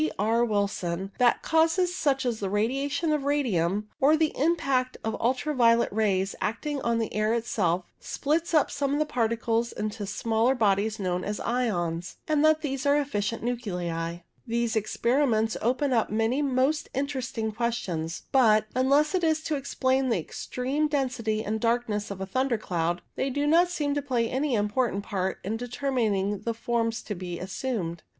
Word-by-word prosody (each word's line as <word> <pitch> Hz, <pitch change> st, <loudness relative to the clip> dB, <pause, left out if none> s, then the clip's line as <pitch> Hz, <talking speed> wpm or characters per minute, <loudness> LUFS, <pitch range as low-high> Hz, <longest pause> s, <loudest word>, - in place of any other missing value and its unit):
R. 225 Hz, +4 st, +2 dB
Wilson 195 Hz, -4 st, -1 dB
that 245 Hz, -1 st, +3 dB
causes 330 Hz, +3 st, +2 dB
such 275 Hz, -6 st, +1 dB
as 235 Hz, -3 st, -1 dB
the 195 Hz, -, -2 dB
radiations 275 Hz, -, 0 dB
of 300 Hz, -2 st, 0 dB
radium, 210 Hz, -, 0 dB
or 300 Hz, +4 st, +5 dB
the 315 Hz, -1 st, +1 dB
impact 270 Hz, -4 st, +1 dB
of 220 Hz, 0 st, -1 dB
ultra 260 Hz, +5 st, 0 dB
violet 235 Hz, -3 st, +4 dB
rays, 200 Hz, -3 st, +1 dB
acting 275 Hz, +6 st, -2 dB
on 235 Hz, 0 st, +1 dB
the 225 Hz, -1 st, -2 dB
air 215 Hz, +2 st, +1 dB
itself, 185 Hz, -6 st, 0 dB
splits 320 Hz, +4 st, -1 dB
up 305 Hz, -, +3 dB
some 280 Hz, 0 st, 0 dB
of -, -, 0 dB
its 305 Hz, -, -2 dB
particles 230 Hz, 0 st, 0 dB
into 215 Hz, 0 st, -4 dB
the 205 Hz, -, -4 dB
smaller 225 Hz, +5 st, +1 dB
bodies 210 Hz, -1 st, +1 dB
known 180 Hz, -2 st, -1 dB
as 205 Hz, 0 st, -3 dB
ions, 175 Hz, -9 st, -1 dB
and 305 Hz, -1 st, +2 dB
that 310 Hz, 0 st, +4 dB
these 275 Hz, -2 st, -2 dB
are 285 Hz, +1 st, +5 dB
efficient 230 Hz, -6 st, -2 dB
nuclei. 175 Hz, -8 st, -3 dB, 0.3 s
These 235 Hz, 0 st, 0 dB
experiments 225 Hz, +1 st, +1 dB
open 255 Hz, +4 st, +1 dB
up 225 Hz, -2 st, +2 dB
many 225 Hz, +6 st, +1 dB
most 280 Hz, +2 st, +1 dB
interesting 260 Hz, -5 st, -2 dB
questions, 205 Hz, -8 st, -3 dB
but, 220 Hz, -5 st, +5 dB
unless 280 Hz, +5 st, +3 dB
it 365 Hz, -2 st, +1 dB
is 315 Hz, -1 st, +2 dB
to 310 Hz, -, -1 dB
explain 260 Hz, -1 st, 0 dB
the 230 Hz, -, +2 dB
extreme 260 Hz, -, -2 dB
density 245 Hz, -7 st, -1 dB
and 220 Hz, +1 st, -2 dB
darkness 230 Hz, -3 st, 0 dB
of 200 Hz, -2 st, -6 dB
a 190 Hz, -, -3 dB
thunder 255 Hz, +4 st, 0 dB
cloud, 175 Hz, -3 st, -2 dB
they 270 Hz, -, -1 dB
do 285 Hz, +2 st, -1 dB
not 335 Hz, +4 st, +4 dB
seem 295 Hz, -5 st, -1 dB
to 290 Hz, -, 0 dB
play 250 Hz, -4 st, 0 dB
any 265 Hz, +2 st, 0 dB
important 210 Hz, 0 st, 0 dB
part 190 Hz, -2 st, -2 dB
in 215 Hz, +4 st, -2 dB
determining 230 Hz, -6 st, -1 dB
the 230 Hz, +2 st, -3 dB
forms 230 Hz, 0 st, -1 dB
to 210 Hz, -, -4 dB
be 175 Hz, -2 st, -5 dB
assumed. 190 Hz, -4 st, -3 dB
235 Hz, 170 wpm, -27 LUFS, 210-275 Hz, 0.3 s, or